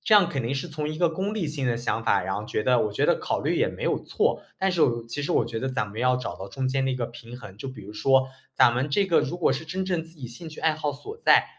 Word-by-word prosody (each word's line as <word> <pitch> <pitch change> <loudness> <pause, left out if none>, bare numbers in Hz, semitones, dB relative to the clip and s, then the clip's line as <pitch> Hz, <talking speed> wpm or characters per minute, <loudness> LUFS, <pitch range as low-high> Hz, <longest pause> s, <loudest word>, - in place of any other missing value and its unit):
这 215 - +4
样 195 -5 +6
肯 135 -5 -2
定 125 +4 -1
是 135 - -2
从 150 0 -3
一 155 - -4
个 170 -1 +3
功 195 +6 -2
利 185 -7 -1
性 145 -3 -2
的 120 - +1
想 115 -1 -1
法， 100 -5 +3
然 95 +1 -2
后 105 +1 -4
觉 105 - -1
得 125 0 +4
我 - - -3
觉 100 - 0
得 - - +4
考 - - -2
虑 - - 0
也 - - +3
没 - - -8
有 - - 0
错， - - 0 0.2
但 190 -1 +1
是 170 - 0
我 - - +6
又 115 0 -4
其 115 +5 -4
实 150 - -2
我 120 - +3
觉 115 0 -4
得 130 - -1
咱 130 -4 0
们 105 +3 -7
要 125 0 +3
找 100 -8 -5
到 95 +1 -7
中 130 +4 -2
间 135 0 +1
的 - - +1
一 - - 0
个 120 - -1
平 120 +1 -9
衡。 105 -6 -10
就 135 - -5
比 130 - -9
如 105 +2 -9
说 130 +4 +3 0.2
咱 - - +6
们 125 +4 -1
这 195 +8 +2
个 170 - +4
如 160 +5 -2
果 175 - +3
是 155 +4 -4
真 185 +4 -2
正 180 -3 -1
自 165 +1 -9
己 130 - -6
兴 125 +8 -8
趣 155 - -11
爱 160 - +3
好 150 -1 -1
所 425 - -6
在， - - +6
135 Hz, 355 characters per minute, -26 LUFS, 120-160 Hz, 0.2 s, 样